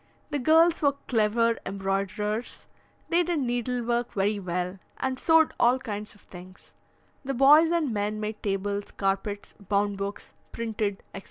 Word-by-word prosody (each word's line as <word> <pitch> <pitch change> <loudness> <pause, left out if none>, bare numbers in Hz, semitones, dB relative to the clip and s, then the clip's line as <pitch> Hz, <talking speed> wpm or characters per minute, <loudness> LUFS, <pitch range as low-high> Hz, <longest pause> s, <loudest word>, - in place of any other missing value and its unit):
The 290 - -1
girls 325 +5 +4
were 285 -2 +3
clever 230 0 +2
embroiderers, 200 +3 -3 0.4
they 345 +1 +3
did 345 -1 -1
needle 245 -1 -1
work 235 +1 -1
very 205 +1 0
well, 180 0 -3 0.2
and 265 0 -2
sewed 320 -1 +4
all 245 +2 +4
kinds 210 -5 -6
of 205 - -20
things; 185 +1 -14 0.5
the 270 0 -3
boys 295 +5 +7
and 325 -7 0
men 210 +1 -2
made 215 0 -4
tables, 200 0 -2
carpets, 200 +1 -2
bound 200 0 -1
books, 200 +1 -5 0.2
printed, 215 -3 -3
etc. - - -5
215 Hz, 150 wpm, -27 LUFS, 200-260 Hz, 0.5 s, boys